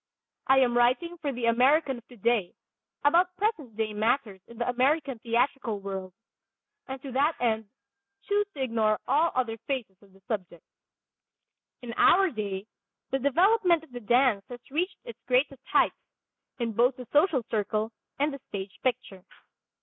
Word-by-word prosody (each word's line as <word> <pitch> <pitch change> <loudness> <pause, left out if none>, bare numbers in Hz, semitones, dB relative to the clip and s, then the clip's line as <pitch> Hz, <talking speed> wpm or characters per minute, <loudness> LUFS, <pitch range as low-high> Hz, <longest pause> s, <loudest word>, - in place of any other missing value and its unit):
I 265 - +5
am 240 -2 +2
writing 255 +9 +2
for 285 - -1
the 245 -2 -3
American 260 +3 +3
of 235 - -24
today 235 -5 -1 0.5
about 355 +4 +3
present 330 - -2
day 220 -1 -1
matters 215 -2 0
in 235 - -13
the 240 - -2
American 265 +1 +1
theatrical 235 -1 0
world, 195 -1 -5 0.8
and 265 0 -5
to 275 - -6
that 285 +5 +2
end 225 -2 0 0.6
choose 415 0 +1
to 270 - -2
ignore 220 -3 +1
all 305 +6 +3
other 235 -3 0
phases 250 -8 -3
of 200 -1 -21
the 195 - -21
subject. 185 -7 -4 1.2
In 235 -1 -6
our 380 -1 +5
day 200 -3 -4 0.5
the 270 - +1
development 345 - +3
of 320 - -17
the 245 - -6
dance 240 -2 +3
has 245 +1 -11
reached 360 +6 -1
its 235 0 -10
greatest 260 +1 +1
heights, - - +3 0.6
in 235 -2 -2
both 245 +4 +3
the 250 - -9
social 295 -4 +3
circle 215 +1 -1 0.3
and 290 +1 0
the 275 - -7
stage 195 -1 -6
picture. 235 -7 -2
245 Hz, 155 wpm, -28 LUFS, 220-285 Hz, 1.2 s, I